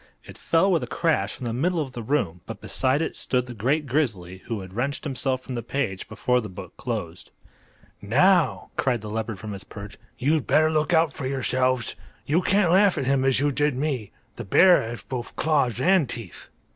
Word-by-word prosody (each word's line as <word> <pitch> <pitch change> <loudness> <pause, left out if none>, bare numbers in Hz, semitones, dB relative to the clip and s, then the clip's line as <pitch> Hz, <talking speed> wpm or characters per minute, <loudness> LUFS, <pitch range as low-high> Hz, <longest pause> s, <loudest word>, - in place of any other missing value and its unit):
It - - -11
fell 170 +4 +2
with 170 - +2
a - - -4
crash 165 -2 0
in 125 - -7
the 115 - -2
middle 170 +8 0
of 140 -4 -3
the 120 -2 -6
room, 105 - -1
but - - -7
beside 135 +5 0
it - - -4
stood 125 -1 -1
the 125 - -8
great 135 +8 0
grizzly, 110 - -1
who 115 -4 -3
had 95 0 -10
wrenched 130 +7 -2
himself 130 -2 -1
from 130 - -7
the 120 - -3
page 115 -9 -3
before 125 +3 +1
the 105 - -7
book 90 - -10
closed. - - -5 0.7
"Now," 165 - +3
cried 125 -4 +1
the 105 -1 -7
leopard 110 -1 -3
from 105 +1 -7
his 100 - -8
perch, 100 +1 -10 0.2
"you'd 150 +2 +1
better 155 0 +4
look 155 +1 +1
out 160 -3 +3
for 130 - -4
yourselves! 130 -2 0 0.3
You 160 +5 +2
can't 195 -2 +2
laugh 195 -1 +4
at 140 - -1
him 135 0 +2
as 135 -1 +2
you 145 +1 +2
did 145 0 +1
at - - -4
me. 135 -9 -2 0.3
The - - -5
bear 180 - +6
has 115 +1 -6
both 125 -3 -6
claws 140 -7 +1
and 175 -3 +3
teeth." 115 -9 -8
130 Hz, 210 wpm, -25 LUFS, 115-155 Hz, 0.7 s, bear